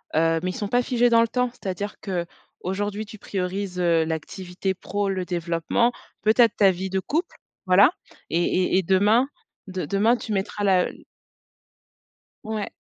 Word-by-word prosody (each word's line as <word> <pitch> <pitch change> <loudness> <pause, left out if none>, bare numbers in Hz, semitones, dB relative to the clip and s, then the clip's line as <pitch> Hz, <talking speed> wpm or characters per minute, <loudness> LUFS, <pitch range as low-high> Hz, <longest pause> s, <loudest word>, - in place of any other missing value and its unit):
heu, 165 0 +3
mais 185 - -2
ils - - -3
sont 205 - -3
pas 245 +3 +3
figés 245 -1 +2
dans 230 0 +5
le 230 - +3
temps. 250 +1 0
C'est-à-dire 205 -2 -5
qu'aujourd'hui 195 +3 -4
tu 215 0 -12
priorises, 185 -1 -3
heu, 170 -2 +3
l'activité 180 +4 -3
pro, 200 +2 -3
le 185 -1 -2
développement, 175 +6 0 0.3
peut-être 225 +1 +4
ta 195 -2 +5
vie 190 +2 -4
de 190 0 0
couple, 320 - -2 0.3
voilà 200 - +6 0.4
et 170 +1 +2
et 185 +1 +2
et 190 - +2
demain, 205 +8 +3 0.4
de 185 -3 -4
demain 210 +8 +3
tu 220 - -7
mettras 200 +1 -2
la 190 -2 +4
l - - -14 1.4
Ouais. 215 -1 -3
195 Hz, 165 wpm, -24 LUFS, 180-215 Hz, 1.4 s, voilà